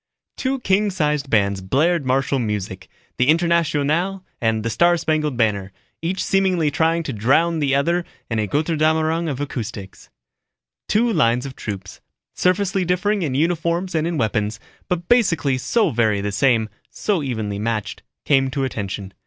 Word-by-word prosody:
_ - - -56
Two 265 0 -1
king 205 0 +2
sized 150 -6 -1
bands 100 -4 +2
blared 145 - +1
martial 135 +1 +1
music, 100 -4 -4 0.3
the 125 - +3
"Internationale" 170 +2 +1 0.2
and 115 -2 +1
the 115 - -1
"Star 175 +7 +3
Spangled 155 -5 -1
Banner," 100 -4 0 0.3
each 180 +4 -2
seemingly 185 -6 +2
trying 165 +3 +1
to 135 - -4
drown 150 +10 +2
the 140 -2 +1
other 170 +5 +1 0.2
in 115 -2 -1
a 105 - 0
Götterdämmerung 160 - +1
of 140 -3 -4
acoustics. 115 -8 -6 0.8
Two 230 +2 +2
lines 120 - +2
of 135 -2 -7
troops, 95 -3 -7 0.3
surfacely 190 +1 +1
differing 195 +4 0
in 145 -6 -1
uniforms 170 +3 0
and 160 0 0
in 170 -2 -2
weapons, 105 -3 -1 0.3
but 175 -2 -2
basically 165 - +2
so 195 - +1
very 110 -4 +1
the 100 +1 -2
same, 110 +1 +2 0.2
so 200 -6 -1
evenly 110 -7 -3
matched, 105 -3 -3 0.2
came 135 -2 +3
to 135 +1 -2
attention. 100 -5 -4
145 Hz, 155 wpm, -21 LUFS, 115-170 Hz, 0.8 s, the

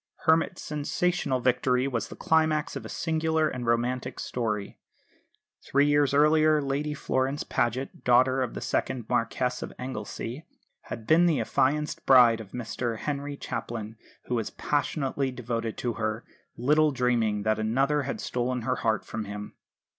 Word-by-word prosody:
Hermit's 165 +2 +2
sensational 150 -2 -1
victory 125 +1 +2
was 120 -4 -2
the - - -10
climax 155 -2 +1
of 135 - -5
a - - -7
singular 160 -1 0
and 125 -5 -4
romantic 120 +2 0
story. 105 -5 -3 0.8
Three 140 +1 +3
years 145 -1 +3
earlier 155 +1 +4
Lady 145 +1 -2
Florence 135 0 -1
Paget, 125 +3 -2
daughter 130 +2 +4
of 125 -3 -2
the - - -5
second 125 -4 -1
Marquess 125 +1 0
of - - -5
Anglesey, 130 +1 -6 0.4
had 115 -2 -7
been 170 +5 +5
the 160 -5 +2
affianced 150 +3 0
bride 120 -4 +7
of 105 - -11
Mr 120 -1 -3
Henry 145 +2 -4
Chaplin, 110 -4 -5 0.3
who - - -3
was 115 -3 -1
passionately 140 -2 -1
devoted 115 -3 -4
to 120 -1 -2
her, 110 +1 -3 0.3
little 150 +5 +4
dreaming 120 -5 +1
that 110 0 +1
another 135 +7 +1
had 135 0 -4
stolen 125 0 -2
her 130 +2 0
heart 110 -1 0
from 110 -1 -5
him. 105 +1 -7
130 Hz, 150 wpm, -27 LUFS, 115-145 Hz, 0.8 s, bride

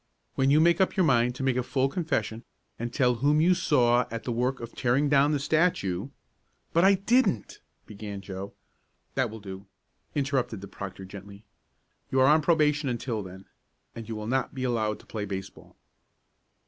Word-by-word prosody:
When 135 0 +2
you 145 +2 +5
make 170 +3 +4
up 190 - +1
your 185 - +4
mind 125 -3 +3
to 135 - -5
make 130 -2 +1
a - - +2
complete 135 +2 0
confession, 125 - -2 0.4
and 120 +1 -3
tell 125 -2 +2
whom 145 +2 +3
you 175 +4 +5
saw 125 -8 +3
at 115 0 -5
the 125 - -3
work 125 +3 -1
of 115 0 -8
tearing 135 +4 +1
down 145 +1 +4
the 150 - +2
statue 140 - 0 0.3
" - - -43
"But 170 - +4
I 195 +1 +6
didn't 200 - +1
" - - -45
began 100 -1 -7
Joe. 95 0 -7 0.6
"That 130 -3 0
will 110 +1 -9
do," 95 0 -9 0.5
interrupted 135 -7 -1
the 100 - -8
proctor 95 -1 -8
gently. 100 +2 -11 0.7
"You 130 - +1
are 130 - +6
on 155 +3 +5
probation 150 -3 +2
until 120 -2 -2
then. 95 0 -10 0.5
And 115 -1 -9
you 110 - -3
will 105 0 -5
not 130 +4 -1
be 130 - -3
allowed 110 -4 0
to - - -22
play 105 -2 -5
baseball." 95 -1 -8
125 Hz, 190 wpm, -27 LUFS, 105-145 Hz, 0.7 s, I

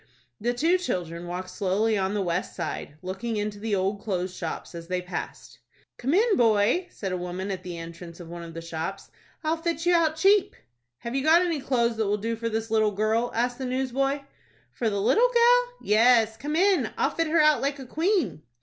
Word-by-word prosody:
The 240 +2 -1
two 335 +8 +3
children 175 - -3
walked 185 +1 -5
slowly 210 +3 +1
on 195 0 0
the 205 - 0
west 175 0 -2
side, 155 -4 -5
looking 195 +5 -3
into 205 0 -3
the 215 -1 -1
old 195 +2 -1
clothes 185 -3 -3
shops, 165 0 -5
as 170 -1 -8
they 180 0 -1
passed. 180 +1 -7 0.4
"Come 270 +7 0
in, 435 +2 +3
boy," 230 - +3
said 195 -3 -5
a 185 - -1
woman 180 +2 -4
at 190 - -4
the 175 -2 -7
entrance 170 +1 -9
of 175 - -9
one 170 +1 -7
of 165 -1 -9
the 165 - -6
shops. 165 +4 -5 0.3
"I'll 315 +1 +1
fit 330 0 -2
you 350 - +4
out 325 -2 +3
cheap." 390 +4 +3 0.5
"Have 235 - -5
you 270 - 0
got 325 +3 +6
any 335 -4 -1
clothes 240 -4 0
that 220 -2 0
will 205 +1 +1
do 230 +3 -2
for 230 +1 -3
this 225 0 -3
little 220 -1 +3
girl?" 220 +4 +1
asked 245 +2 0
the 260 - -3
newsboy. 265 +2 -1 0.5
"For 230 - 0
the 200 -1 -2
little 460 - +4
gal? - - +4
Yes, 225 +1 +4
come 290 +7 -4
in; 360 - +3
I'll - - +1
fit 330 -1 -1
her 325 +1 +2
out 305 -4 +5
like 280 +1 -1
a 265 - -8
queen." 330 - 0
225 Hz, 215 wpm, -26 LUFS, 185-300 Hz, 0.5 s, got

